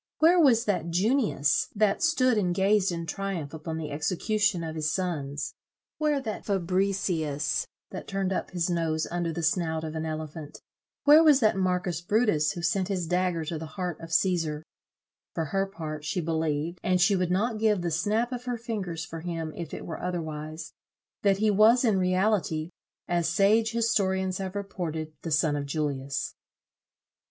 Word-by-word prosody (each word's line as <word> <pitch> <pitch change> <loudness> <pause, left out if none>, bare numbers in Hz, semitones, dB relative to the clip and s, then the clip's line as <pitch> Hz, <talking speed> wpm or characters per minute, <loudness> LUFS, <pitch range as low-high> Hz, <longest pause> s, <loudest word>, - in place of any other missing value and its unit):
Where 340 +3 +5
was 245 -7 +5
that 180 -5 0
Junius, 195 - +2
that 205 -1 +2
stood 255 -8 +3
and 180 -4 +1
gazed 195 0 +3
in 170 -1 -4
triumph 175 -4 -4
upon 160 0 -5
the 155 -2 -5
execution 180 +5 0
of 160 -1 -4
his 155 -1 -1
sons? 150 -6 -3 0.5
Where 300 -2 +2
that 225 -5 -5
Fabricius, 180 -6 0 0.2
that - - -7
turned 195 -1 -1
up - - -2
his 175 -2 -1
nose 165 -3 0
under 175 -1 -1
the 170 +1 -4
snout 160 -1 0
of 155 -1 -4
an 160 0 -3
elephant? 155 -1 -6 0.4
Where 300 +3 +8
was 300 -4 +6
that 215 -3 +4
Marcus 180 -2 0
Brutus, 175 -6 +2
who 170 - -6
sent 180 +2 +1
his 190 -4 -1
dagger 180 -1 0
to 160 0 -4
the 160 - -6
heart 180 -4 -3
of 165 - -8
Cæsar? 165 -3 +1 0.7
For 165 - -1
her 195 +6 0
part, 155 -5 -6
she 160 - -2
believed, 160 0 -1
and 185 0 +1
she 195 +3 +4
would 180 -2 0
not 215 +5 0
give 210 -4 +2
the 170 - -1
snap 210 +9 0
of 250 -1 -5
her 245 -1 -2
fingers 195 -8 -4
for 165 +1 -7
him 165 -2 -4
if 170 -3 -6
it - - -6
were 165 - -6
otherwise, 155 -2 -5 0.5
that 200 -2 +3
he 215 +1 +2
was 225 +5 +5
in 210 -5 +3
reality, 185 -3 +1 0.4
as 170 -2 +1
sage 210 +5 +3
historians 190 -5 +1
have 190 0 -4
reported, 160 -6 -4
the 165 - -5
son 155 -1 +2
of 140 -1 -3
Julius." 140 -2 -2
180 Hz, 175 wpm, -27 LUFS, 160-205 Hz, 0.7 s, Where